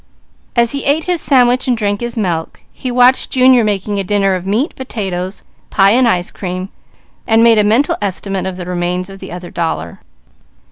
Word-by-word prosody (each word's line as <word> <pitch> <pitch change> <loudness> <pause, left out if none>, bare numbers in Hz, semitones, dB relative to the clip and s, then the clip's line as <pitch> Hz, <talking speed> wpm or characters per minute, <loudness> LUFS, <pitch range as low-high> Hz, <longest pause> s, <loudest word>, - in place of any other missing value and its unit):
As 235 -1 +3
he 280 - -4
ate 295 +3 +1
his 355 -2 -1
sandwich 250 -2 +3
and 245 -2 +1
drank 205 -1 -1
his 240 0 -4
milk, 170 -6 -2
he 255 - -5
watched 250 +1 +3
Junior 255 -2 +4
making 205 -1 -1
a - - -1
dinner 195 0 +1
of 185 0 -4
meat, 225 - 0
potatoes, 190 -7 -5 0.3
pie 195 +1 +4
and 250 +2 +4
ice 180 -5 0
cream, 185 0 -5 0.6
and 225 0 +4
made 230 -2 +5
a - - +4
mental 225 +8 +2
estimate 195 -1 -3
of 185 -1 -5
the 180 - -6
remains 180 +1 -2
of 195 - -11
the - - -9
other 175 0 -8
dollar. 125 - -3
205 Hz, 190 wpm, -15 LUFS, 185-245 Hz, 0.6 s, made